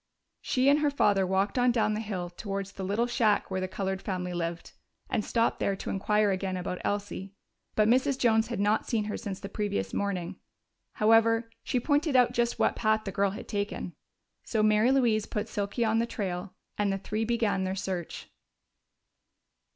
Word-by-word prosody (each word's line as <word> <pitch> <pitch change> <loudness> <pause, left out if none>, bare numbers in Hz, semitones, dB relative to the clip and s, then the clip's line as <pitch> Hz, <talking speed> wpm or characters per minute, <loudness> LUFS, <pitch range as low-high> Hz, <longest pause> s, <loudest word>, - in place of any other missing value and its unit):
She 255 +1 +1
and 285 +2 +6
her 300 -1 +2
father 205 -9 +2
walked 195 +5 +1
on 245 0 +4
down 225 -3 +1
the 210 - -2
hill 190 -5 -4
towards 195 +1 -5
the 195 - -7
little 205 +5 +1
shack 230 -5 +1
where 190 0 -1
the 185 - -1
colored 190 0 -3
family 180 -2 -3
lived, 170 -1 -4 0.4
and 215 - +1
stopped 230 +2 +1
there 200 - +1
to - - -5
inquire 210 +1 +2
again 190 0 -2
about 180 0 -4
Elsie. 200 -1 -3 0.4
But 215 -1 +4
Mrs. 260 +3 +3
Jones 225 -3 +3
had 235 -4 -4
not 205 +2 +1
seen 225 -3 0
her 210 0 -3
since 200 -4 -5
the 200 - -6
previous 195 - -2
morning; 185 -2 -2 0.6
however, 225 +1 +3
she 250 - 0
pointed 290 +2 +1
out 250 -1 +5
just 235 0 0
what - - +2
path 220 -1 +1
the 195 - -4
girl 200 0 +1
had 195 - -8
taken. 200 -3 -3 0.5
So 220 -2 0
Mary 215 +3 +4
Louise 235 -6 +2
put 210 +1 -3
Silky 205 +2 -1
on 220 +1 +2
the 230 - 0
trail, 185 -4 -4 0.2
and 205 -1 +2
the 195 - 0
three 215 +3 -3
began 225 -4 +1
their 190 0 -2
search. 185 -3 -4
210 Hz, 190 wpm, -28 LUFS, 190-230 Hz, 0.6 s, and